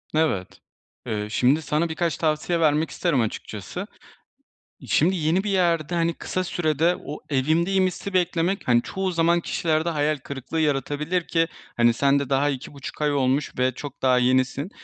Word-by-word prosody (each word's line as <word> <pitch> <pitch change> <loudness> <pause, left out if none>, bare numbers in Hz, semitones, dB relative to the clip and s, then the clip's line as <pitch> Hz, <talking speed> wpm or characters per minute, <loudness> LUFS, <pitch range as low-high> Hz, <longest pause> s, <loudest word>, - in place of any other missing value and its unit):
Evet. 155 - 0 0.5
Eee, 105 -1 -2
şimdi 130 +8 +2
sana 155 +3 0
birkaç 165 +1 -1
tavsiye 160 +2 0
vermek 155 0 +2
isterim 160 -8 0
açıkçası. 105 -3 -5 1.0
Şimdi 180 +5 +3
yeni 170 +3 +1
bir 210 - -2
yerde, 175 -4 +1
hani, 170 0 +1
kısa 185 +3 -3
sürede 165 -1 +1
o 150 - -6
evimdeyim 165 +7 +2
hissi 185 +2 -5
beklemek, 180 +1 0
hani, 120 -1 +4
çoğu 190 +7 -3
zaman 170 0 +2
kişilerde 160 0 0
hayal 150 -1 0
kırıklığı 140 +3 -5
yaratabilir 150 +4 -1
ki, 165 -1 +2 0.3
hani, 120 0 +5
sen 140 +4 +3
de 140 -2 -4
daha 140 +1 +2
2,5 140 +1 -6
ay 150 -1 +2
olmuş 135 +1 +1
ve 130 0 +3
çok 145 +2 -9
daha 130 -1 +4
yenisin. 130 +5 +1
155 Hz, 160 wpm, -24 LUFS, 135-170 Hz, 1.0 s, hani